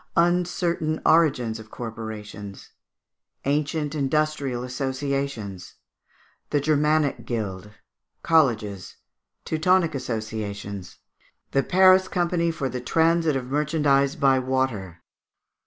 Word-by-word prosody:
Uncertain 170 -2 +1
Origin 150 -8 +4
of 110 0 -12
Corporations. 110 -4 -8 0.7
Ancient 145 +1 0
Industrial 145 -3 0
Associations. 130 -8 -3 0.7
The 145 - +2
Germanic 150 0 +1
Guild. 105 -4 -4 0.5
Colleges. 110 - +1 0.5
Teutonic 165 +1 +2
Associations. 110 -6 -5 0.5
The 135 - +3
Paris 185 +2 +5
Company 175 -1 0
for 155 -5 -2
the 125 0 -4
Transit 165 +2 +2
of 130 -2 -2
Merchandise 145 -2 +2
by 135 -1 +3
Water. 120 -10 -2
135 Hz, 90 wpm, -24 LUFS, 110-155 Hz, 0.7 s, Paris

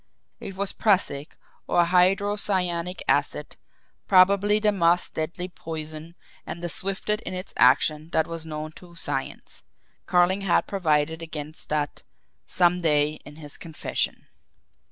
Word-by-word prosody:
It 200 -5 -7
was 200 0 -1
prussic, 180 -9 +1 0.3
or 175 - +4
hydrocyanic 185 -1 +1
acid, - - 0 0.5
probably 200 +2 +5
the 215 0 +2
most 175 -2 +2
deadly 170 +3 -3
poison 160 -1 -7 0.3
and 170 - -7
the 175 - -2
swiftest 195 +4 -2
in 185 - -5
its 185 +1 -6
action 150 +5 +3
that 160 -1 +2
was 165 -1 -6
known 155 -1 -5
to 175 -1 -15
science 145 -5 -5 0.5
Carling 180 +2 +3
had 195 -3 +2
provided 160 -4 0
against 155 -1 -7
that 150 -1 -1 0.5
"some 180 0 +3
day" 150 -1 +2
in 145 - -11
his 150 -2 -8
confession! 160 -2 -3
170 Hz, 130 wpm, -25 LUFS, 155-190 Hz, 0.5 s, probably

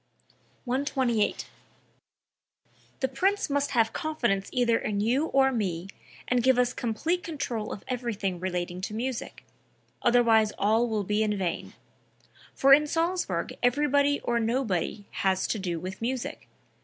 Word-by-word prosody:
128. 255 -3 0 1.6
"The 265 - +2
Prince 365 +6 0
must 285 0 +1
have 225 -3 +2
confidence 240 - -1
either 240 -2 +2
in 205 -1 -2
you 250 +9 +1
or 270 -2 +3
me, 190 -6 -2 0.4
and 250 -1 +2
give 260 +1 +4
us 250 0 +2
complete 290 +10 -1
control 250 -10 -4
of 200 - -7
everything 220 -8 -2
relating 180 0 -3
to 210 +3 -4
music; 245 +1 -4 0.6
otherwise 230 -3 +4
all 220 +4 +2
will 215 -2 -1
be 210 +2 0
in 210 -1 +1
vain. 180 -3 -3 0.8
For 275 0 +6
in 300 +2 +5
Salzburg 340 +4 -1
everybody 285 +2 +2
or 235 0 0
nobody 225 -4 -1 0.2
has 190 -1 +2
to 220 - -1
do 175 -3 -3
with 185 +4 -7
music. 250 +1 -3
235 Hz, 135 wpm, -27 LUFS, 205-270 Hz, 1.6 s, For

